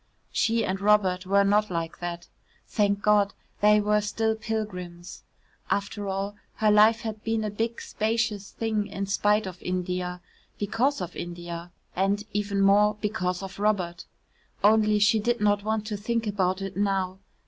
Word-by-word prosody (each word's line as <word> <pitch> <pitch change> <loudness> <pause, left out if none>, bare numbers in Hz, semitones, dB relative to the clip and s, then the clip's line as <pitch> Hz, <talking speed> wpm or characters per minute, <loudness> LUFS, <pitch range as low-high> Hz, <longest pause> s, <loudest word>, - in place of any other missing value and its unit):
She 230 -1 +1
and 190 0 -2
Robert 195 -3 +3
were 200 +1 +4
not 210 +2 +3
like 165 -2 -3
that. 175 0 -5 0.4
Thank 200 -1 0
God, 205 -1 +3 0.3
they 210 0 +6
were 210 0 +2
still 220 +2 0
pilgrims. 185 -6 -5 0.5
After 200 0 -2
all, 195 +1 -3 0.2
her 215 -1 +3
life 215 +2 +5
had 220 -1 -5
been 225 -1 0
a 210 - -2
big 225 +3 -2
spacious 220 -2 -1
thing 220 -2 -2
in 195 -1 -4
spite 210 +1 +2
of 185 -1 -8
India, 180 0 -2 0.4
because 230 +6 0
of 175 -1 -5
India 175 0 -6 0.2
and, 195 +2 +1
even 200 -1 0
more, 205 +2 +5
because 195 -4 -2
of 195 +1 -8
Robert. 185 -5 0 0.6
Only 215 0 +5
she 210 +2 +4
did 240 +3 0
not 205 -1 +2
want 215 0 -1
to 210 -1 -3
think 230 +2 -1
about 195 -2 0
it 195 0 -5
now. 190 -2 0
205 Hz, 160 wpm, -26 LUFS, 190-215 Hz, 0.6 s, they